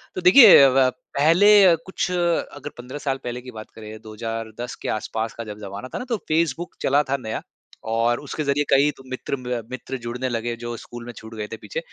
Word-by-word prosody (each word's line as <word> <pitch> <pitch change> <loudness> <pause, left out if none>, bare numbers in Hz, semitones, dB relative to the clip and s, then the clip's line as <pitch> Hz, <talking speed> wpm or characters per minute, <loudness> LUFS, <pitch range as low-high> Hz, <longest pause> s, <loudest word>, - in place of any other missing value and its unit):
तो 185 - -3
देखिए 200 +5 +9
अ, 135 - +7
व 130 0 +4 0.3
पहले 195 +7 +6
अ, 175 -3 +6
कुछ 190 0 -3
अगर 170 -5 -1
15 125 +3 -8
साल 135 -2 -2
पहले 125 0 -5
की 125 - -10
बात 110 -2 -10
करें, 110 0 -10
2010 115 +2 -6
के - - -4
आस-पास 110 0 -3
का 115 - -7
जब 105 -2 -8
ज़माना 100 +4 -7
था - - -2
ना, 250 - -6
तो 230 - 0
फेसबुक 165 +1 -1
चला 145 +2 +3
था 140 - +1
नया 110 -4 -5 0.5
और 115 +1 +1
उसके 150 +1 -5
ज़रिए 140 +1 +1
कई 145 +2 +4
तो 135 - -14
मित्र 130 +1 -4
म 125 -1 -3
मित्र 130 +1 -5
जुड़ने 120 +1 -4
लगे, 120 0 -3
जो 120 0 -6
स्कूल 120 -1 -10
में 120 - -7
छूट 110 +1 -11
गए 105 -1 -5
थे 115 - -5
पीछे। 485 - -6
125 Hz, 220 wpm, -23 LUFS, 115-145 Hz, 0.5 s, देखिए